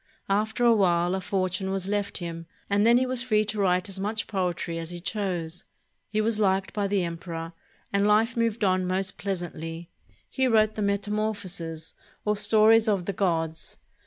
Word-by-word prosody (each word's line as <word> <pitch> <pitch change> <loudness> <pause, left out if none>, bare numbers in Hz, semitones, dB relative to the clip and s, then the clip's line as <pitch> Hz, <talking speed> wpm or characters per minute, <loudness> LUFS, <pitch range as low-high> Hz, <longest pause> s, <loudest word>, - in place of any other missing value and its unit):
After 220 +4 +1
a 235 - +7
while 175 -4 +2
a 190 - -1
fortune 185 0 -1
was 190 -1 -2
left 205 0 -1
him, 165 -1 -6 0.2
and 205 +2 +3
then 235 +1 +6
he 255 - +2
was 255 -1 +2
free 215 -4 +2
to 210 0 -3
write 180 -1 +2
as 195 -1 -6
much 215 +3 -2
poetry 175 -4 -2
as 165 -1 -6
he 175 0 -6
chose. 175 -3 -3 0.5
He 215 +1 0
was 220 0 0
liked 190 -2 +1
by 205 -2 0
the 195 -2 +1
emperor, 165 -1 -5 0.4
and 200 +1 +3
life 220 +4 +3
moved 230 -2 0
on 185 -1 +2
most 190 0 -2
pleasantly. 170 -2 -5 0.4
He 265 -1 0
wrote 215 -2 +3
the 215 - -4
"Metamorphoses," 200 -5 -2 0.3
or 210 0 +2
stories 215 +2 +5
of 195 -4 0
the 200 - -2
gods. 165 -4 -2
195 Hz, 180 wpm, -26 LUFS, 175-215 Hz, 0.5 s, a